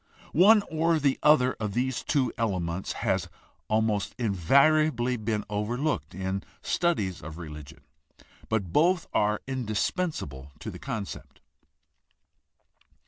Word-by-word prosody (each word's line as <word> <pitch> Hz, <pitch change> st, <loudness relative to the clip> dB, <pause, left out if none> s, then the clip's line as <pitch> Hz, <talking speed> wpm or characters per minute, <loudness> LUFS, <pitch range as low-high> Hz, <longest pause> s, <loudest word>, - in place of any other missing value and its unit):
One 205 Hz, +6 st, +6 dB
or 160 Hz, +1 st, +1 dB
the 140 Hz, -3 st, +1 dB
other 140 Hz, -4 st, +5 dB
of 105 Hz, -3 st, -3 dB
these 125 Hz, +1 st, 0 dB
two 130 Hz, -6 st, +1 dB
ele 110 Hz, -6 st, 0 dB
ments 85 Hz, +2 st, -3 dB
has 95 Hz, -4 st, 0 dB, 0.4 s
almost 110 Hz, -1 st, 0 dB
invariably 125 Hz, -, +3 dB
been 110 Hz, -2 st, -2 dB
overlooked 105 Hz, -, -2 dB
in 95 Hz, +1 st, -2 dB, 0.2 s
studies 105 Hz, -, 0 dB
of 80 Hz, +2 st, -8 dB
religion, 75 Hz, -2 st, -9 dB, 0.7 s
but 100 Hz, -6 st, -1 dB
both 175 Hz, +3 st, +3 dB
are 105 Hz, 0 st, +1 dB
indispensable 110 Hz, -, -3 dB
to -, -, -6 dB
the -, -, -10 dB
concept. 105 Hz, -3 st, -6 dB
110 Hz, 115 wpm, -27 LUFS, 95-140 Hz, 0.7 s, One